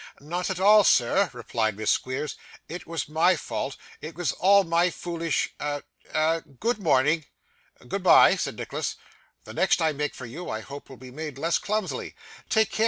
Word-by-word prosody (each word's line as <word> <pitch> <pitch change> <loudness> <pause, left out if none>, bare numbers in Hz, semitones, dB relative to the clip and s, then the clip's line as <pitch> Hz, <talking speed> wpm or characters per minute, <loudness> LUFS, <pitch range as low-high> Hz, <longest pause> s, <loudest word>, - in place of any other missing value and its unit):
'Not 175 +6 -3
at 185 -2 -3
all, 210 +2 +7
sir,' 180 +7 +3
replied 115 -3 -2
Miss 110 0 +1
Squeers; 130 +3 -2 0.3
'it 175 +3 -8
was 165 -2 -3
my 160 +4 +3
fault. 140 -3 -4 0.2
It 155 +1 -7
was 175 0 0
all 200 +2 +4
my 170 +1 +2
foolish 170 -2 -2
a 145 -1 -3 0.3
a 160 +1 +1
good 165 - -3
morning!' 155 -2 +2 0.6
'Goodbye,' - - +5
said - - -3
Nicholas. - - -3 0.5
'The - - -10
next - - +2
I 160 -1 +2
make 150 0 -3
for 130 - -8
you, 150 +10 -7
I 110 - -3
hope 140 +4 -10
will 135 - -11
be 130 0 -12
made 150 0 -6
less 165 +4 +1
clumsily. 210 -1 -3 0.3
Take 220 -1 +3
care! - - -5
160 Hz, 175 wpm, -26 LUFS, 140-180 Hz, 0.6 s, all